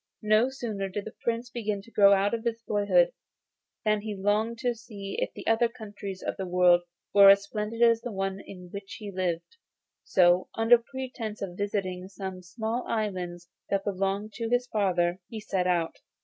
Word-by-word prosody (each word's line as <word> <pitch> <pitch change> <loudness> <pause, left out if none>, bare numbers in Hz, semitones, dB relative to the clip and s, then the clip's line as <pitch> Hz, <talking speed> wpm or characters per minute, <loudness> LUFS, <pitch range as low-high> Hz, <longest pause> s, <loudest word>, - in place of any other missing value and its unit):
No 215 +4 +4
sooner 220 -7 -4
did 200 +2 -4
the 220 - -7
Prince 235 +1 -2
begin 215 -4 -2
to 230 - -17
grow 200 -2 +6
out 200 +1 +3
of 230 -1 -2 0.2
boyhood 215 - +3 0.7
than 215 -1 +2
he 215 -1 -4
longed 210 +4 0
to 245 -1 +1
see 210 -4 -8
if - - -1
the - - -8
other 225 +1 +3
countries 205 -5 -8
of - - -3
the 190 - -4
world 180 -1 +5 0.3
were 200 -1 +9
as 200 0 +7
splendid 215 +3 -2
as 230 -1 +5
the 245 - -5
one 195 -1 -2
in 180 -3 -11
which 200 -1 -7
he 210 -2 -7
lived. 185 - -3 0.5
So, 180 0 +4
under 225 +1 +6
pretence 240 -4 -6
of 180 -3 -5
visiting 190 -2 -2
some 190 -1 -7
small 220 +6 -3
islands 180 -5 -3 0.2
that 200 -1 0
belonged 200 +1 -2
to 230 -1 -2
his 245 +1 +2
father, 185 -6 +1
he 225 - -6
set 185 -3 -1
out. 170 -2 0
205 Hz, 180 wpm, -28 LUFS, 190-225 Hz, 0.7 s, were